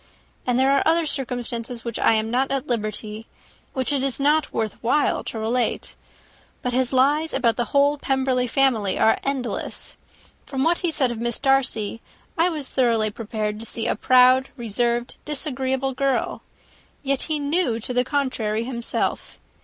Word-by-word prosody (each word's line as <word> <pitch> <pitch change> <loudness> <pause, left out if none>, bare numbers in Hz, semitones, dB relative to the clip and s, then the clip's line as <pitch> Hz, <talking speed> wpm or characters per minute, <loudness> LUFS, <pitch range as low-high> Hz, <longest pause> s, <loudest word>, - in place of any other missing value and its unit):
And 245 -1 +2
there 265 +1 +4
are 275 - +3
other 330 +1 +2
circumstances 245 -4 -4
which 235 -2 -4
I - - +4
am 220 0 0
not 260 +2 +1
at 275 -1 -1
liberty 215 -1 -4 0.5
which 260 +2 0
it 275 - +1
is 270 -1 +1
not 300 +3 +2
worth 220 -2 -3
while 270 +6 +1
to - - -5
relate; 230 +3 -1 0.7
but 250 - -1
his 255 0 +2
lies 290 +4 +2
about 235 -4 +2
the 240 - -1
whole 285 +2 +2
Pemberley 260 -2 0
family 235 -6 +2
are 220 - +3
endless. 270 -3 -4 0.5
From 265 -1 -2
what 335 +3 +2
he 350 - 0
said 280 -6 +1
of 235 - -5
Miss 235 -1 -1
Darcy, 250 -6 +1 0.3
I 335 +2 +3
was 305 -5 -4
thoroughly 230 -4 +1
prepared 215 -1 -4
to 225 - -6
see 225 - +1
a - - +1
proud, 255 +1 +5
reserved, 240 +1 -1
disagreeable 265 -2 -2
girl. 270 +1 -1 0.6
Yet 275 -1 0
he 310 - +1
knew 285 -4 0
to 250 - -3
the 250 0 +3
contrary 250 -5 -1
himself. 235 -1 -3
255 Hz, 165 wpm, -23 LUFS, 230-275 Hz, 0.7 s, proud